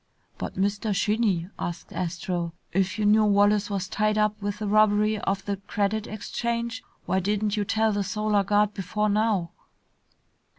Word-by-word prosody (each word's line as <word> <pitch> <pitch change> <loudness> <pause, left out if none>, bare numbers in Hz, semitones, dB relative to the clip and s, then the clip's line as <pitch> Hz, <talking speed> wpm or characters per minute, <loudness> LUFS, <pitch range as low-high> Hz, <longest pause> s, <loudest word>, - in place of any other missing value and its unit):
"But, - - -5
Mr. 205 +2 0
Shinny," 205 -4 +1
asked 175 0 -5
Astro, 170 -1 -3 0.2
"if 190 +2 +1
you 210 - 0
knew 215 +1 +5
Wallace 205 0 +3
was 195 -2 -2
tied 215 +1 0
up 210 0 +1
with 205 0 -3
the 210 0 -3
robbery 215 0 +3
of 195 -1 -2
the 200 -1 -2
Credit 205 +2 -2
Exchange, 235 +2 -3 0.2
why 185 +1 +1
didn't 205 +2 0
you 210 - 0
tell 220 +2 +1
the 205 -1 0
Solar 210 0 +1
Guard 210 +1 +2
before 210 +2 -1
now?" 205 -5 +1
205 Hz, 160 wpm, -26 LUFS, 195-215 Hz, 0.2 s, knew